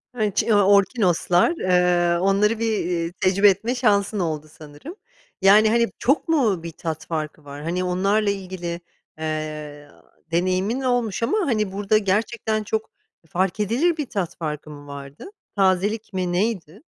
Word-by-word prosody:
Evet, 210 Hz, -4 st, -1 dB
ç -, -, +3 dB
ya, 205 Hz, -3 st, +3 dB
orkinoslar, 195 Hz, -, +3 dB
eee, 180 Hz, -, +2 dB
onları 200 Hz, +4 st, +2 dB
bir, 225 Hz, -1 st, 0 dB
eee, 170 Hz, -1 st, -2 dB
tecrübe 190 Hz, +2 st, +4 dB
etme 220 Hz, +6 st, -1 dB
şansın 210 Hz, -4 st, +1 dB
oldu 155 Hz, -4 st, -2 dB
sanırım. 155 Hz, -, -11 dB, 0.5 s
Yani, 210 Hz, +3 st, +6 dB
hani, 235 Hz, +1 st, +3 dB
çok 275 Hz, +7 st, +1 dB
mu 235 Hz, -, +1 dB
bir 170 Hz, -, -6 dB
tat 160 Hz, -1 st, -5 dB
farkı 155 Hz, -2 st, -4 dB
var? 145 Hz, +1 st, -9 dB
Hani, 175 Hz, +3 st, -2 dB
onlarla 195 Hz, +4 st, +1 dB
ilgili, 185 Hz, -3 st, -4 dB, 0.4 s
eee, 155 Hz, -2 st, -5 dB, 0.4 s
deneyimin 185 Hz, +8 st, 0 dB
olmuş 245 Hz, -5 st, 0 dB
ama, 325 Hz, -, +1 dB
hani, 215 Hz, -7 st, 0 dB
burada 205 Hz, +2 st, +1 dB
gerçekten 215 Hz, +2 st, -1 dB
çok, 220 Hz, +1 st, -3 dB, 0.3 s
e, -, -, -26 dB
fark 185 Hz, +4 st, -1 dB
edilir 255 Hz, -, +1 dB
bir 300 Hz, -, -2 dB
tat 190 Hz, -5 st, -3 dB
farkı 150 Hz, -2 st, -5 dB
mı 145 Hz, -1 st, -11 dB
vardı? 140 Hz, 0 st, -9 dB, 0.3 s
Tazelik 200 Hz, +3 st, +1 dB
mi, 185 Hz, -1 st, -1 dB
neydi? 190 Hz, -, -2 dB
190 Hz, 150 wpm, -22 LUFS, 170-215 Hz, 0.5 s, Yani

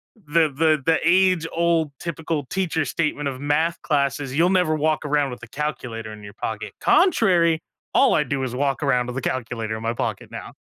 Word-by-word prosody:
the 165 Hz, -5 st, +1 dB
the 155 Hz, +1 st, +2 dB
the 165 Hz, -1 st, +3 dB
age-old 170 Hz, -3 st, +2 dB
typical 160 Hz, -3 st, -3 dB
teacher 165 Hz, -3 st, -1 dB
statement 145 Hz, -3 st, -1 dB
of 130 Hz, -1 st, -6 dB
math 155 Hz, +4 st, 0 dB
classes, 140 Hz, -2 st, -1 dB
"You'll 175 Hz, +3 st, +4 dB
never 180 Hz, -4 st, +2 dB
walk 155 Hz, 0 st, 0 dB
around 145 Hz, -2 st, +1 dB
with 125 Hz, -, -9 dB
a 115 Hz, -, -10 dB
calculator 115 Hz, -7 st, -4 dB
in 105 Hz, -1 st, -11 dB
your 100 Hz, 0 st, -11 dB
pocket." -, -, -5 dB
Contrary, 175 Hz, -, +3 dB, 0.3 s
all 270 Hz, -, +5 dB
I 150 Hz, -, +3 dB
do 135 Hz, 0 st, -2 dB
is 125 Hz, -1 st, -3 dB
walk 140 Hz, +1 st, -1 dB
around 125 Hz, -3 st, +2 dB
with 125 Hz, +1 st, -6 dB
a 130 Hz, -, -3 dB
calculator 115 Hz, -3 st, -3 dB
in 110 Hz, -, -8 dB
my 115 Hz, +1 st, -1 dB
pocket -, -, -4 dB
now. -, -, -8 dB
150 Hz, 190 wpm, -23 LUFS, 130-165 Hz, 0.3 s, all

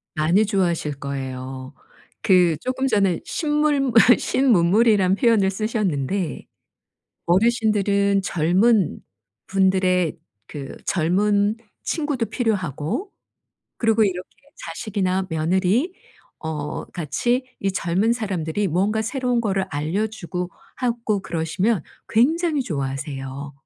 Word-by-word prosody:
많이 170 Hz, +7 st, +3 dB
좋아하실 170 Hz, -8 st, -1 dB
거예요. 130 Hz, -1 st, -6 dB, 0.5 s
그 180 Hz, -5 st, +4 dB
쪼끔 260 Hz, +1 st, -2 dB
전에 195 Hz, -7 st, +2 dB
신물물 295 Hz, -4 st, +1 dB, 0.3 s
신문물이란 205 Hz, -4 st, +3 dB
표현을 215 Hz, -4 st, +3 dB
쓰셨는데 190 Hz, -, -2 dB, 0.8 s
어르신들은 200 Hz, -1 st, +2 dB
젊은 185 Hz, +4 st, +2 dB, 0.5 s
분들의 185 Hz, -3 st, +2 dB, 0.3 s
그 140 Hz, -2 st, -8 dB
젊은 200 Hz, +5 st, +1 dB, 0.3 s
친구도 290 Hz, -7 st, -1 dB
필요하고 200 Hz, -, -2 dB, 0.7 s
그리고 225 Hz, -1 st, +3 dB
이렇게 185 Hz, -2 st, -2 dB, 0.4 s
자식이나 190 Hz, +1 st, -2 dB
며느리 185 Hz, -, +1 dB, 0.5 s
어 155 Hz, -2 st, -4 dB
같이 240 Hz, -, -1 dB, 0.2 s
이 195 Hz, -1 st, 0 dB
젊은 190 Hz, +6 st, +1 dB
사람들이 200 Hz, -4 st, -2 dB
뭔가 195 Hz, +6 st, +1 dB
새로운 250 Hz, +1 st, 0 dB
거를 195 Hz, -4 st, 0 dB
알려 160 Hz, +9 st, -1 dB
주고 180 Hz, -4 st, -5 dB, 0.3 s
하고 230 Hz, -5 st, -1 dB
그러시면 170 Hz, +4 st, -1 dB, 0.3 s
굉장히 305 Hz, +5 st, +2 dB
좋아하세요. 135 Hz, -, -5 dB
195 Hz, 245 characters per minute, -22 LUFS, 165-225 Hz, 0.8 s, 그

